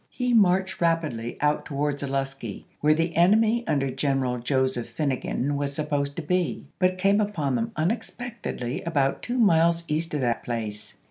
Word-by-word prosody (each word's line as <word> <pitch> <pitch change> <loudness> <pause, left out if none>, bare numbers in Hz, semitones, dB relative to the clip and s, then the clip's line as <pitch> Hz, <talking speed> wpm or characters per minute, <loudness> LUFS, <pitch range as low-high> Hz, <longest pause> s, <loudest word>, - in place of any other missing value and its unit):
He 250 -1 -1
marched 190 -4 +3
rapidly 155 -9 0
out 150 0 +2
to 140 - -6
wards 145 0 -1
Olustee, 135 -5 -4
where 150 +1 +4
the 165 +1 -1
enemy 215 +7 +4
under 135 -2 +1
General 135 -2 0
Joseph 130 -1 0
Finegan 140 -1 -1
was 140 0 -2
supposed 145 -2 -1
to 165 - -4
be, 175 -4 -1
but 185 0 +2
came 200 +3 +3
upon 165 -10 -1
them 115 -2 -1
unexpectedly 205 - -3
about 140 -5 0
two 245 +1 -3
miles 170 -6 +4
east 155 +1 -2
of 145 - -1
that 120 -2 0
place. 110 -3 -5
150 Hz, 160 wpm, -25 LUFS, 135-180 Hz, -, where